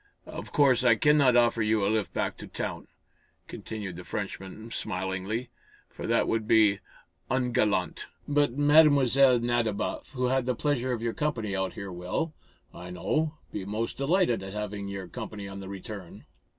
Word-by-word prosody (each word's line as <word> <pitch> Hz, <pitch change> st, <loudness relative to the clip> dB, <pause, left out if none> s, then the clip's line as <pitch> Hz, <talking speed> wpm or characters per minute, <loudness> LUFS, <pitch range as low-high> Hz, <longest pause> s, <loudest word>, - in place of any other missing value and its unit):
"Of -, -, -8 dB
course 135 Hz, -4 st, +4 dB
I 120 Hz, -2 st, +6 dB
cannot 145 Hz, 0 st, +4 dB
offer 120 Hz, -1 st, +4 dB
you 110 Hz, -2 st, +2 dB
a -, -, +2 dB
lift 110 Hz, -1 st, 0 dB
back -, -, -2 dB
to -, -, -9 dB
town," -, -, -5 dB, 0.6 s
continued 100 Hz, -6 st, -6 dB
the 90 Hz, -, -8 dB
Frenchman, 100 Hz, +2 st, -6 dB
smilingly, 95 Hz, +5 st, -3 dB, 0.4 s
"for -, -, -6 dB
that -, -, +2 dB
would 110 Hz, -1 st, -1 dB
be 105 Hz, -3 st, +5 dB, 0.5 s
ungallant. 125 Hz, -4 st, 0 dB, 0.2 s
But 145 Hz, -3 st, +2 dB
Mlle. 140 Hz, -3 st, +6 dB
Nadiboff, 120 Hz, -1 st, -1 dB
who 125 Hz, -1 st, -1 dB
had 130 Hz, 0 st, +1 dB
the 125 Hz, -, +1 dB
pleasure 130 Hz, -1 st, 0 dB
of 115 Hz, -2 st, -2 dB
your 115 Hz, -1 st, -1 dB
company 115 Hz, -10 st, -2 dB
out 95 Hz, -1 st, -1 dB
here 100 Hz, -1 st, -7 dB
will, 90 Hz, -, -3 dB, 0.4 s
I 90 Hz, +1 st, -9 dB
know, 155 Hz, -, -1 dB, 0.2 s
be 100 Hz, -, -3 dB
most 105 Hz, +4 st, -3 dB
delighted 140 Hz, -, +2 dB
at 95 Hz, 0 st, -7 dB
having 105 Hz, -1 st, -4 dB
your 100 Hz, -2 st, -5 dB
company 105 Hz, -2 st, -7 dB
on 100 Hz, 0 st, -7 dB
the 95 Hz, -1 st, -8 dB
return." 100 Hz, -1 st, -8 dB
115 Hz, 165 wpm, -28 LUFS, 100-130 Hz, 0.6 s, I